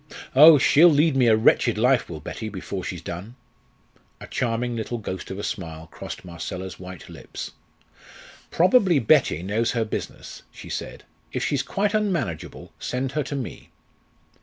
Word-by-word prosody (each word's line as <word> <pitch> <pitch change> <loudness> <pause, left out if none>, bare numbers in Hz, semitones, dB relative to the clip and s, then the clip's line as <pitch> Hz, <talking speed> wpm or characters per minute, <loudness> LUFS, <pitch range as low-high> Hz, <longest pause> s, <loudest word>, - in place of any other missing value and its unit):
Oh! 150 +3 +10
she'll 155 +5 +6
lead 150 -1 +3
me 130 -2 +4
a 110 - +6
wretched 115 +1 +3
life, 125 +2 +2
will 80 -3 -6
Betty, 110 +8 -6
before 95 -1 -6
she's 85 -3 -6
done!" 95 +9 -7 0.8
A - - -9
charming 120 0 -2
little 115 +1 -3
ghost 95 -4 -6
of 95 - -5
a 105 - -5
smile 80 -4 -5
crossed - - -8
Marcella's 90 +2 -6
white 90 -1 -10
lips. - - -8 1.0
"Probably 185 - +4
Betty 130 - +3
knows 110 +5 0
her 115 -2 0
business," 110 - -6
she - - -12
said; - - -6 0.3
"if - - -2
she's - - 0
quite 205 +1 -1
unmanageable, 175 - -2
send 130 +1 -3
her 150 +2 -1
to 140 0 -4
me." 130 -4 -6
115 Hz, 160 wpm, -24 LUFS, 95-145 Hz, 1.0 s, Oh